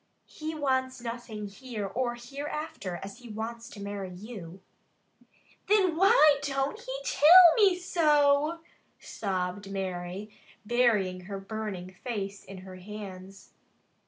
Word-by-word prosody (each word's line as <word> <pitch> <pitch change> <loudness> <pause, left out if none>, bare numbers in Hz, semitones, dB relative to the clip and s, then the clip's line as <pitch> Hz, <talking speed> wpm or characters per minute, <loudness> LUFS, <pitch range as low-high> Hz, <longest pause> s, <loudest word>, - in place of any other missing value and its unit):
"He 315 +1 -6
wants 260 -3 0
nothing 230 -3 -6
here 215 +1 -6
or 240 +4 -2
hereafter 275 - -5
as 195 0 -9
he 245 -1 -12
wants 230 +2 -6
to - - -11
marry 200 -1 -5
you." 185 -2 -9 1.1
"Thin 385 -5 +3
why 335 - +6
don't 275 +6 -1
he - - -8
till 340 +1 +8
me 395 -5 +5
so?" 305 -2 +3 0.4
sobbed 190 -1 -4
Mary, 190 +1 -5 0.3
burying 210 -6 +2
her 195 0 -5
burning 195 -3 -6
face 200 -5 -4
in 190 -1 -10
her 185 -1 -10
hands. 195 -1 -10
225 Hz, 120 wpm, -29 LUFS, 195-285 Hz, 1.1 s, till